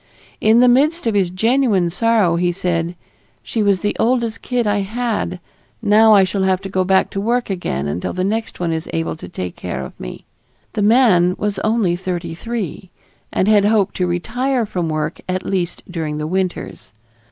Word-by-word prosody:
In 220 +2 +5
the 250 - +6
midst 295 +7 +3
of 225 - +1
his 195 -3 +2
genuine 210 -2 +2
sorrow 215 -4 +2
he 175 +1 +1
said: 175 -1 -2 0.5
"She 225 - -2
was 200 -3 +2
the 205 - -1
oldest 235 -1 +1
kid 245 -2 -1
I 205 0 +1
had. 210 -3 -2 0.4
Now 220 +1 +5
I 195 - +6
shall 190 +1 -1
have 190 -1 +2
to 195 - -6
go 185 -1 +1
back 190 +1 +2
to 195 - -3
work 235 +1 0
again 75 - -2
until 80 +5 -3
the 185 - -2
next 220 +3 -2
one 175 -2 -1
is 160 +1 -4
able 165 0 -1
to - - -10
take 90 - -5
care - - -5
of - - -12
me." - - -8 0.5
The 215 - -1
man 205 -6 +4
was 210 -1 -2
only 215 -5 +1
thirty 175 -2 -4
three 195 -2 -5 0.4
and 185 - +1
had 210 -2 +5
hoped 210 -2 +2
to 180 - +1
retire 240 +8 -1
from 180 -5 -3
work 155 +1 -3
at 185 0 -2
least 180 -3 -2
during 160 -4 -4
the 150 - -3
winters. 185 - -3
195 Hz, 190 wpm, -19 LUFS, 175-225 Hz, 0.5 s, the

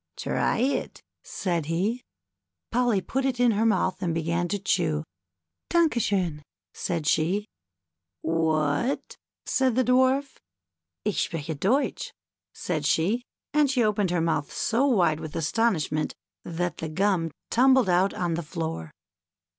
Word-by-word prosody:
" - - -55
Try - - 0
it," 260 +5 -1 0.2
said 170 -5 -2
he. 195 +9 0 0.7
Polly 240 -5 +2
put 265 +7 -2
it 260 -2 -1
in 245 -1 +5
her 220 +2 +2
mouth 185 -3 +1
and 170 -3 -1
began 170 +2 0
to 205 - -1
chew. 170 -6 0 0.7
Danke 330 -8 +3
schon," 180 -8 0 0.3
said 165 -3 -3
she. 170 +8 +1 0.8
'^What?" 160 - 0 0.3
said 260 -3 +1
the 255 - +3
Dwarf. 260 +3 +2 0.3
" 80 -1 -62
Ich 210 - 0
spreche 160 -1 -4
Deutsch" 230 - 0 0.4
said 160 -4 -3
she, 195 +12 +2 0.3
and 300 -2 +4
she 255 -3 +2
opened 210 -3 +1
her 175 -1 +1
mouth 160 -3 0
so 240 +5 +1
wide 175 - +3
with 155 0 -7
astonishment 160 -3 0 0.3
that 175 0 -3
the 160 - -4
gum 180 0 +1 0.2
tumbled 260 -1 +5
out 185 +2 +2
on 175 -2 -1
the 170 - -1
floor. 160 - -4
185 Hz, 140 wpm, -26 LUFS, 160-240 Hz, 0.8 s, in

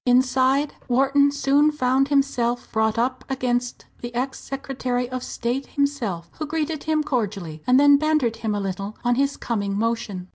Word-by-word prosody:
Inside, 260 +3 +3 0.2
Wharton 275 +3 +3
soon 285 +1 +3
found 265 -2 +1
himself 255 -4 0
brought 220 0 +1
up 255 +2 0
against 245 -2 -2 0.2
the 240 - -5
ex 260 +2 -2
Secretary 260 -2 -3
of 255 0 -4
State 245 +3 -3
himself, 245 -12 -2
who 310 - -3
greeted 315 0 -2
him 310 -1 +1
cordially, 200 - -3
and 250 +1 +5
then 285 0 +7
bantered 300 -7 +1
him 220 -2 -2
a - - -1
little 195 +2 -4
on 245 - +3
his 275 +3 0
coming 200 -4 -2
motion. 210 -5 -2
255 Hz, 160 wpm, -23 LUFS, 230-280 Hz, 0.2 s, then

